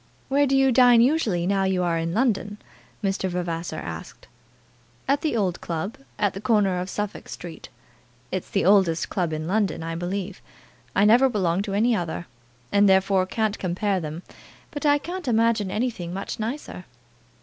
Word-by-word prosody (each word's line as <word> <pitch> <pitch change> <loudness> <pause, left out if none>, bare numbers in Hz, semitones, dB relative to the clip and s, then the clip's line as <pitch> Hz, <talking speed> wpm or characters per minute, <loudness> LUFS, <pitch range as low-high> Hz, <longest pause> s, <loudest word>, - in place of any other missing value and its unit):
"Where 285 +1 +3
do 270 0 +2
you 270 -1 +4
dine 245 -1 +6
usually, 235 - +2
now 195 +1 +1
you 190 -1 +1
are 170 -1 +1
in 165 0 -2
London?" 210 -2 0 0.5
Mr. 195 -1 0
Vavasor 170 -2 -3
asked. 80 0 -8 0.8
"At 280 +1 +2
the 300 -7 0
old 185 -4 -1
club, 170 - -4 0.2
at 205 - +1
the 195 - -7
corner 210 -4 +2
of 180 +1 -4
Suffolk 205 +1 -5
Street. 170 -2 -9 0.6
It's 185 -1 -3
the 195 - 0
oldest 185 -4 +3
club 175 -4 -1
in 155 0 -3
London, 195 -2 0
I 165 0 -4
believe. 185 +3 -4 0.5
I 200 - +4
never 245 +5 +6
belonged 190 -4 0
to 195 - -3
any 230 +3 +3
other, 175 -2 -3 0.5
and 205 0 +5
therefore 190 0 +3
can't 215 +1 -1
compare 190 +2 0
them; 160 +1 -6 0.5
but 295 +1 -2
I 290 0 +5
can't 350 +2 -6
imagine 225 -3 +2
anything 210 -5 -2
much 195 - -5
nicer." 235 +7 -5
195 Hz, 170 wpm, -24 LUFS, 175-230 Hz, 0.8 s, dine